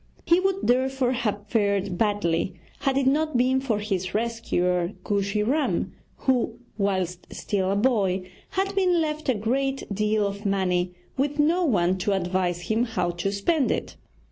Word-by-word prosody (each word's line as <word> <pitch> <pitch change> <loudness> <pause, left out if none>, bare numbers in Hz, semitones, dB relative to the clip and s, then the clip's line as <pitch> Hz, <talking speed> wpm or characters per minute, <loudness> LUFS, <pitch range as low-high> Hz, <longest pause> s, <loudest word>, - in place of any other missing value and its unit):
He 340 +1 +5
would 385 +1 0
therefore 260 +1 +2
have 210 -5 -2
fared 200 -3 0
badly 185 -4 0 0.2
had 270 -1 +1
it 275 - +2
not 300 +1 +2
been 260 +2 +3
for 240 -6 0
his 195 -3 -2
rescuer, 185 -6 0
Kooshy 200 0 0
Ram, 285 +8 0 0.3
who, 245 -3 +1 0.2
whilst 185 -3 -1
still 190 -2 -1
a 195 - +1
boy, 200 -5 +1 0.2
had 390 +1 -1
been 365 -3 +3
left 305 -2 -2
a 255 - +3
great 270 +6 -1
deal 210 +1 +1
of 200 +1 -4
money 180 -3 0 0.2
with 285 +2 0
no 325 +5 +3
one 185 - +2
to 200 +2 +1
advise 180 -1 0
him 220 +7 0
how 180 -7 -1
to 175 +3 -2
spend 265 +9 +1
it. - - -2
210 Hz, 160 wpm, -25 LUFS, 190-265 Hz, 0.3 s, He